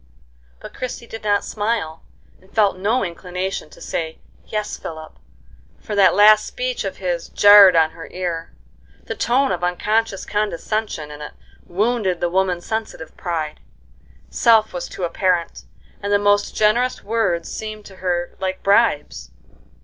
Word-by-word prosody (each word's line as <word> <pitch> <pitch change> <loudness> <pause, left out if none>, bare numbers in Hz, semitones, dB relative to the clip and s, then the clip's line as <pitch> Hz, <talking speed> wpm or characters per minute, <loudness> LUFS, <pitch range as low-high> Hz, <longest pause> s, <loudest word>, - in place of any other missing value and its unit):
But - - -11
Christie 250 -1 -6
did 225 -1 -9
not 205 -1 +2
smile, 210 -7 -2 0.4
and 190 - -22
felt 210 -4 +2
no 205 +5 0
inclination 180 0 -5
to - - -16
say 160 -1 -4 0.3
"Yes, 210 -1 -3
Philip," 160 -1 -8 0.7
for 215 - -7
that 200 -2 +5
last 210 +1 +6
speech - - -3
of - - -5
his - - -3
jarred 205 -3 +8
on 160 -1 +4
her 165 0 -10
ear. 175 -2 -4 0.5
The - - -5
tone 265 +3 +1
of 180 -1 -3
unconscious 205 +3 0
condescension 210 -5 -2
in 150 0 -10
it 150 - -8 0.3
wounded 200 -1 0
the 175 -1 -1
woman's 185 -1 0
sensitive 220 -7 -5
pride; 160 -4 -4 0.7
self 225 -2 +4
was 175 - -5
too 185 - -7
apparent, 175 0 -1 0.4
and 200 0 -3
the 205 - +5
most 205 0 +1
generous 235 +4 +2
words 195 -6 -1
seemed 215 -1 -6
to 190 - -13
her 175 -2 -2
like 185 0 -3
bribes. 150 - +2
195 Hz, 150 wpm, -21 LUFS, 175-215 Hz, 0.7 s, jarred